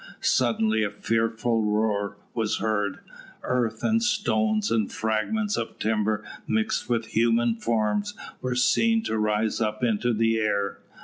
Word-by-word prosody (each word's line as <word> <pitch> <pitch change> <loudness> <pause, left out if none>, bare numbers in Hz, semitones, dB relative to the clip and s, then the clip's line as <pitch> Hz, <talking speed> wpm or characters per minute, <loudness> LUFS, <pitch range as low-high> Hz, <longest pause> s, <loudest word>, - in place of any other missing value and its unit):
Suddenly 110 -3 +2
a 105 - 0
fearful 115 +2 0
roar 105 -1 0 0.2
was 110 -3 0
heard. 105 -3 -1 0.4
Earth 125 -3 -1
and 225 0 +2
stones, 110 - +1
and 110 -3 +1
fragments 115 - -1
of 115 - -4
timber 110 0 0 0.2
mixed 110 +2 0
with 115 -2 +1
human 115 +1 +3
forms, 115 - -1 0.3
were 125 -1 -2
seen 225 - +3
to 110 - -1
rise 105 +1 0
up 110 +1 -1
into 120 +1 +1
the 115 0 +2
air. 100 -2 -1
110 Hz, 135 wpm, -26 LUFS, 105-120 Hz, 0.4 s, human